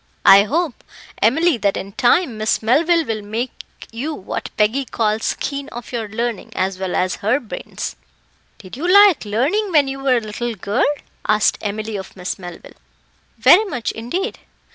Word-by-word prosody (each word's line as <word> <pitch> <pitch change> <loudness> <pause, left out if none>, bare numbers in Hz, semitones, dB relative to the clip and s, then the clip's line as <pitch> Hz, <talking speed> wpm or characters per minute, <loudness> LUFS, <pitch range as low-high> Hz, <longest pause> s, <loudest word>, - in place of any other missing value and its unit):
I 200 +1 +8
hope, 310 +1 -2 0.4
Emily, 290 - +3
that 200 -2 +1
in 195 - -6
time, 250 - +2
Miss 215 +1 0
Melville 325 +8 +3
will 220 -3 -3
make 225 +5 -3 0.4
you 280 +7 -4
what 190 - -5
Peggy 220 +6 +2
calls 220 -3 -1
keen 280 0 -4
of 240 -1 -9
your 230 -4 -3
learning, 230 0 -4
as 190 0 -1
well 190 -1 -2
as 185 0 0
her 220 +7 +1
bairns." 230 - -6 0.6
"Did 185 0 -11
you 340 +7 -1
like 400 - +6
learning 290 - 0
when 295 -4 +4
you 270 0 -4
were 270 -2 +2
a - - +2
little 230 +2 -4
girl?" 200 +2 0 0.4
asked 215 0 +2
Emily 215 +1 -3
of 190 - -9
Miss 180 +2 -4
Melville. 175 -2 -10 0.6
"Very 280 - +6
much, 250 - -3
indeed." 345 - -4
230 Hz, 165 wpm, -19 LUFS, 210-280 Hz, 0.6 s, I